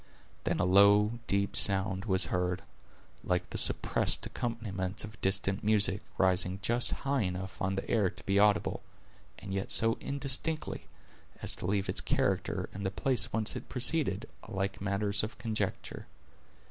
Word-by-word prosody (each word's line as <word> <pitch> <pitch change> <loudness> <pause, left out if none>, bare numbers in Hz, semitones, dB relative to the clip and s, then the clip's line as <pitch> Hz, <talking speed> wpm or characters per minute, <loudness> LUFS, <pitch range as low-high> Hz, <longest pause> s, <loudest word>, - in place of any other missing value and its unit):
Then - - 0
a 90 - +2
low, 100 +4 +5
deep 100 0 0
sound 95 0 +3
was 95 -4 +3
heard, 90 +1 -1 0.6
like 90 -1 -1
the - - -3
suppressed - - +2
accompaniment 105 -6 -3
of 105 -2 -10
distant 95 0 +1
music, 105 -2 +3 0.2
rising 95 0 +2
just 120 +4 +2 0.2
high 140 -1 +1
enough 95 0 -4
on 95 0 0
the 95 - -4
air 105 -5 +2
to 95 +2 -13
be 100 +1 +2
audible, 105 0 +2 0.6
and 95 0 -7
yet 95 0 -3
so 115 0 +3
indistinctly, 140 +3 -3 0.6
as - - +2
to - - -5
leave 100 0 0
its - - -1
character, - - -1
and 100 - -6
the 95 - 0
place 125 +4 0
whence 110 -1 0
it - - -7
proceeded, 125 -5 0 0.2
alike 95 -2 -3
matters 100 0 0
of 110 0 -6
conjecture. 110 -2 -4
100 Hz, 155 wpm, -31 LUFS, 95-110 Hz, 0.6 s, low